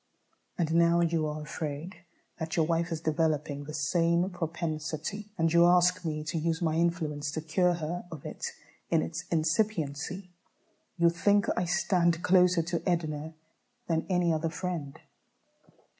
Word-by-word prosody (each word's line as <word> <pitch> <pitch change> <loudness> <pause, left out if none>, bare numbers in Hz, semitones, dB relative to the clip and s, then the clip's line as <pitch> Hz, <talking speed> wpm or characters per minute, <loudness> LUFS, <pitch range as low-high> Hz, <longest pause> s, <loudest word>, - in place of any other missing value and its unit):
And 160 -2 0
now 170 +1 +4
you 165 -2 +1
are 150 0 -4
afraid 155 +4 -5 0.4
that 160 -1 -3
your 160 - +4
wife 170 +1 0
is 160 -1 -3
developing 150 -3 0
the 155 - -7
same 170 +4 +1
propensity, 165 +3 -4
and 165 -1 +2
you 170 0 +7
ask 180 +1 +4
me 155 -2 -2
to 155 +1 -2
use 165 +1 0
my 165 -3 0
influence 160 -3 0
to 160 - -2
cure 175 +3 +2
her 170 +2 -4
of 155 -4 -9
it - - -5 0.4
in - - +3
its 80 - -5
incipiency. 165 0 -1 0.7
You 170 -1 +4
think 200 +4 +3
I 180 - 0
stand 175 -2 +1
closer 180 -2 +4
to 170 0 -2
Edna 160 -2 -2 0.5
than 160 -1 -1
any 180 -2 +2
other 160 +1 -1
friend. 165 -4 -4
165 Hz, 150 wpm, -29 LUFS, 155-175 Hz, 0.7 s, you